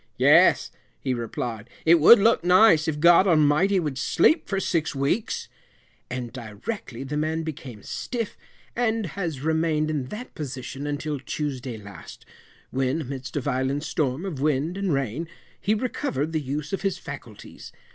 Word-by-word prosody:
"Yes," - - +5 0.3
he 130 - -1
replid, 115 -1 -4 0.2
"it 165 +1 +6
would 200 +10 +9
look 225 -2 +3
nice, 180 -3 +5
if 150 -2 -1
God 175 +4 +6
Almighty 165 +4 +4
would 150 -6 -3
sleep 315 - +3
for 195 - 0
six 165 -5 -1
weeks," 140 +11 -1 0.6
and 125 -2 -5
directly 125 - -6
the 140 +2 -5
man 160 +2 -1
became 135 -9 -7
stiff, 235 -4 -4 0.4
and 225 -2 0
has 165 -6 -4
remained 160 0 +1
in 145 -4 -2
that 215 - -8
position 135 0 -6
until 145 0 -3
Tuesday 130 -4 -4
last, 100 -4 -12 0.5
when, 135 +4 0
amidst 130 0 -6
a - - 0
violent 130 +3 -1
storm 150 +1 -1
of 155 -9 -5
wind 150 +3 0
and 195 -2 -1
rain, 135 +3 -1 0.3
he 215 - +1
recovered 210 - -2
the 160 -1 -1
use 145 +3 -4
of 195 - -1
his 195 -2 -1
faculties. - - -10
150 Hz, 155 wpm, -25 LUFS, 130-175 Hz, 0.6 s, would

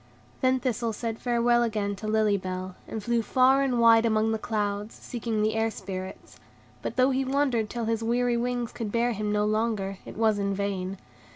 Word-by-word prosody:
Then 260 -1 +3
Thistle 235 -2 -1
said 225 0 -4
farewell 240 0 +2
again 210 -3 -1
to 215 - -6
Lily 215 -1 +3
Bell, 185 -1 -4
and 220 -2 -5
flew 235 +1 +1
far 260 +4 +4
and 260 -3 +1
wide 230 -1 +6
among 220 -1 +2
the 220 - -1
clouds, 210 -1 -2
seeking 230 -3 -3
the 215 0 +1
Air 225 0 +1
Spirits; 190 -2 -8 0.4
but - - -4
though 255 +1 +4
he 265 +1 +1
wandered 265 -5 +1
till 235 -2 -3
his 225 0 0
weary 240 +1 +1
wings 245 0 -1
could 225 -3 -5
bear 235 +2 +1
him 210 -1 -2
no 210 0 +1
longer, 215 -3 -1
it - - -10
was 220 -2 +2
in 200 0 0
vain. 195 -1 -3
225 Hz, 195 wpm, -27 LUFS, 210-240 Hz, 0.4 s, wide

